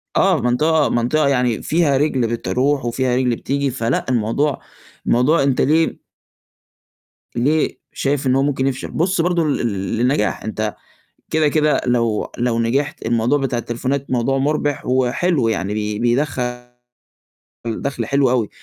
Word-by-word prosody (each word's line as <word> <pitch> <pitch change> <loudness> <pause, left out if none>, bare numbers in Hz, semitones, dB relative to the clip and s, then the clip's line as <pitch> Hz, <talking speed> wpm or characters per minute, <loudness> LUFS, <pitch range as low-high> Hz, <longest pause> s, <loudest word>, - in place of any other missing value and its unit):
آه، - - +3
مَنطقة 150 +6 +2
مَنطقة 140 +6 +1
يعني 125 -4 +1
فيها 155 -4 +2
رِجل 135 -4 +1
بتروح 125 +4 0
وفيها 125 +1 0
رِجل 125 -2 +1
بتيجي 140 +3 -1
فلأ، 115 -1 -1
الموضوع 125 +4 0 0.5
الموضوع 135 +6 +3
أنت 135 -2 +1
ليه 160 +3 +2 1.4
ليه 145 +6 +1 0.2
شايف 140 0 -1
إن 130 - +3
هو 135 - +3
ممكن 135 -2 0
يفشل، 130 -1 -3
بُص 180 +2 +1
برضه 175 0 +1
لل 110 -10 -1
للنجاح 120 -2 0
أنت 110 -1 -3 0.6
كده، 155 -1 +2
كده 150 0 +2
لو 115 -3 0
لو 120 -1 0
نجِحت 140 +7 -1
الموضوع 120 +4 +2
بتاع 135 -3 -1
التليفونات 130 +4 -3
موضوع 130 +2 +1
مُربِح 145 0 -1
وحلو، 130 +2 +1
يعني 105 -2 -1
بي 105 -1 -2
بيدخّل 125 0 -1 1.0
دَخل 115 +1 -3
حلو 140 0 +2
أوي. 120 -4 +1
130 Hz, 140 wpm, -19 LUFS, 120-145 Hz, 1.4 s, آه